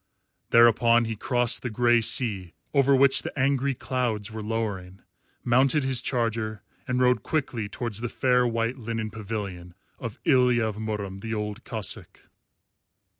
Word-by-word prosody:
Thereupon 115 0 +5
he 110 0 -3
crossed 120 +2 +1
the 120 - -3
grey 120 +1 +3
sea 100 -8 0 0.2
over 140 -1 +4
which 135 0 +5
the - - -7
angry 135 0 +1
clouds 120 -5 -2
were 110 0 -6
lowering, 105 -4 -4 0.4
mounted 130 +4 +3
his 130 -2 +1
charger, 110 -3 -2 0.2
and 125 0 0
rode 125 0 +3
quickly 125 -9 -2
towards 115 0 -4
the 120 - -3
fair 125 0 +2
white 115 +2 -1
linen 110 -2 -4
pavilion 100 -5 -6 0.2
of 115 -4 -6
Ilya 125 -4 +4
of 110 -2 -4
Murom 105 -3 -4
the 110 +2 -4
Old 105 +2 -5
Cossáck. 110 -4 -4
115 Hz, 145 wpm, -26 LUFS, 110-125 Hz, 0.4 s, Thereupon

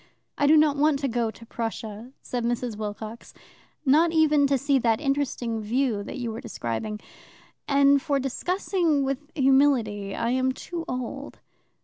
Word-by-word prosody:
"I 285 - +2
do 310 +2 +7
not 300 -2 +4
want 300 0 +3
to 275 - 0
go 235 -2 0
to 225 +2 -12
Prussian" 225 +1 -6
said 245 -1 -3
Mrs. 240 -1 -2
Wilcox 215 +2 -7 0.5
"not 310 +5 +4
even 305 -3 +4
to 275 0 +2
see 275 +1 +2
that 230 -2 +2
interesting 275 -5 -1
view 230 0 0
that - - -7
you 240 -2 -3
were 220 - -6
describing. 210 - -4 0.7
And 280 0 +4
for 285 -2 0
discussing 330 +2 0
with 275 +2 -3
humility 260 -8 +2
I 230 - -1
am 260 +1 +1
too 335 +4 -6
old. 255 +3 -5
260 Hz, 155 wpm, -25 LUFS, 230-285 Hz, 0.7 s, do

